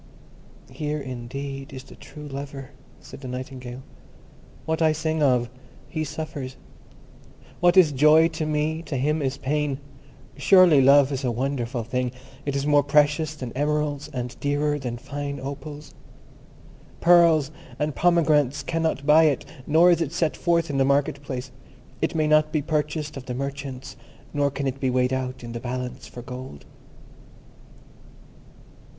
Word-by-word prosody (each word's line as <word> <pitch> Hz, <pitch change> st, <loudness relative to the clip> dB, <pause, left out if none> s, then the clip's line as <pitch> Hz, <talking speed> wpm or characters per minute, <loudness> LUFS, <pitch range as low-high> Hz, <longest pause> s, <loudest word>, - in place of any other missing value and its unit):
"Here 150 Hz, 0 st, -3 dB
indeed 135 Hz, +2 st, -6 dB
is 130 Hz, -1 st, -8 dB
the -, -, -15 dB
true 150 Hz, +1 st, -11 dB
lover," 140 Hz, -1 st, -7 dB, 0.3 s
said -, -, -12 dB
the 130 Hz, -, -7 dB
Nightingale. 125 Hz, 0 st, -7 dB, 0.8 s
"What 160 Hz, +1 st, -1 dB
I 160 Hz, -1 st, +4 dB
sing 160 Hz, 0 st, -1 dB
of, 125 Hz, -4 st, +3 dB, 0.4 s
he 155 Hz, -1 st, -3 dB
suffers—what 155 Hz, +4 st, -5 dB
is 170 Hz, -5 st, +7 dB
joy 150 Hz, +4 st, +6 dB
to 160 Hz, -1 st, -3 dB
me, 155 Hz, +1 st, -1 dB
to 140 Hz, -, -2 dB
him 150 Hz, +4 st, 0 dB
is 135 Hz, 0 st, -1 dB
pain. 145 Hz, 0 st, -1 dB, 0.6 s
Surely 180 Hz, -7 st, +6 dB
Love 140 Hz, +1 st, +6 dB
is 135 Hz, 0 st, -3 dB
a 125 Hz, -, +1 dB
wonderful 120 Hz, -1 st, -2 dB
thing. 125 Hz, +2 st, -2 dB, 0.4 s
It 140 Hz, -, -1 dB
is 140 Hz, 0 st, -1 dB
more 145 Hz, -1 st, +5 dB
precious 150 Hz, +2 st, +2 dB
than 125 Hz, -5 st, -7 dB
emeralds, 150 Hz, 0 st, -1 dB
and 125 Hz, -1 st, -5 dB
dearer 145 Hz, +1 st, 0 dB
than 120 Hz, -3 st, -4 dB
fine 140 Hz, +2 st, -5 dB
opals. 145 Hz, +3 st, -8 dB, 1.1 s
Pearls 165 Hz, -4 st, +5 dB, 0.3 s
and 150 Hz, 0 st, -1 dB
pomegranates 150 Hz, -5 st, +2 dB
cannot 160 Hz, -4 st, -1 dB
buy 155 Hz, +2 st, +6 dB
it, 145 Hz, -4 st, +1 dB, 0.2 s
nor 165 Hz, +4 st, +6 dB
is 170 Hz, -1 st, +2 dB
it 155 Hz, -3 st, -1 dB
set 165 Hz, -2 st, 0 dB
forth 170 Hz, -3 st, +1 dB
in 135 Hz, -, -1 dB
the -, -, +5 dB
marketplace. 140 Hz, -1 st, -1 dB, 0.5 s
It -, -, 0 dB
may 155 Hz, -1 st, +2 dB
not 155 Hz, 0 st, +3 dB
be 150 Hz, -2 st, 0 dB
purchased 150 Hz, 0 st, -2 dB
of 130 Hz, -, -9 dB
the 125 Hz, -, -3 dB
merchants, 140 Hz, -1 st, -5 dB, 0.4 s
nor 145 Hz, -1 st, +2 dB
can 140 Hz, 0 st, -4 dB
it 135 Hz, 0 st, -2 dB
be 130 Hz, -, 0 dB
weighed 125 Hz, 0 st, +1 dB
out 130 Hz, -1 st, -3 dB
in 120 Hz, -, -7 dB
the 115 Hz, -, -5 dB
balance 125 Hz, +1 st, -5 dB
for 120 Hz, -, -10 dB
gold." 125 Hz, -, -9 dB
140 Hz, 150 wpm, -24 LUFS, 130-155 Hz, 1.1 s, is